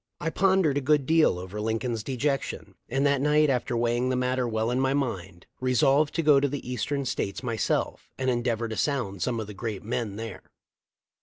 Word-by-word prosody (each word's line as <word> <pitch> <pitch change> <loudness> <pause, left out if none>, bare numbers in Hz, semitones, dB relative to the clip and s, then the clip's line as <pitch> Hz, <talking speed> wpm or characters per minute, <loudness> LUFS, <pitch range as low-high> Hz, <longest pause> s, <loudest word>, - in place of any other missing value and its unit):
1 160 - -2
pondered 185 -7 +3
a - - -6
good 145 0 +2
deal 160 - +4
over 95 +4 -6
Lincoln's 110 +1 -1
dejection, 135 +4 -2 0.2
and 135 +3 +1
that 140 -1 +2
night, 150 0 +4
after 125 -1 -1
weighing 120 +2 +1
the 130 - +1
matter 125 0 0
well 110 +1 -1
in 125 - 0
mind, 120 -10 -2
resolved 135 +4 +2
to 165 - +1
go 145 -2 +6
to 140 - +1
the 140 -1 -5
eastern 135 +3 -2
States 100 -3 -3
myself 115 -4 -1
and 130 - -2
endeavor 120 -2 0
to 110 - -5
sound 115 - -1
some 115 +4 0
of 110 - -3
the 105 - -9
great 105 0 -5
men 115 -2 -3
there. 110 -4 -6
125 Hz, 190 wpm, -27 LUFS, 110-140 Hz, 0.2 s, go